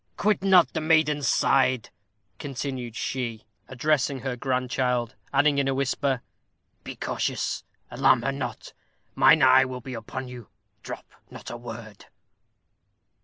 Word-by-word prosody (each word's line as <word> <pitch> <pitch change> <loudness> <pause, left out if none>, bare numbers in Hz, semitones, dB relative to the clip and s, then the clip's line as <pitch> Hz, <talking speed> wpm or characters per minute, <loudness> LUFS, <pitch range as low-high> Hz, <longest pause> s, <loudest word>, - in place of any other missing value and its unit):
Quit 210 -1 +1
not 185 -3 +5
the 160 - -2
maiden's 155 -3 +2
side," 130 -3 +2 0.5
continued 130 -4 -5
she, 120 -5 -4 0.2
addressing 135 0 0
her 130 -1 -3
grandchild, 125 -1 -1 0.2
adding, 140 +1 +3
in 140 - +1
a 135 - 0
whisper, 135 -1 -1 0.6
"Be - - -7
cautious - - -2 0.3
alarm 120 -2 +3
her 135 - 0
not 135 -2 -6 0.4
mine 155 -3 +5
eye 130 0 +7
will 130 -1 -5
be 130 +1 -8
upon 130 +3 -6
you 125 -4 -10 0.3
drop - - -8 0.2
not - - -9
a - - -5
word." 115 -3 -10
130 Hz, 130 wpm, -26 LUFS, 125-140 Hz, 0.6 s, eye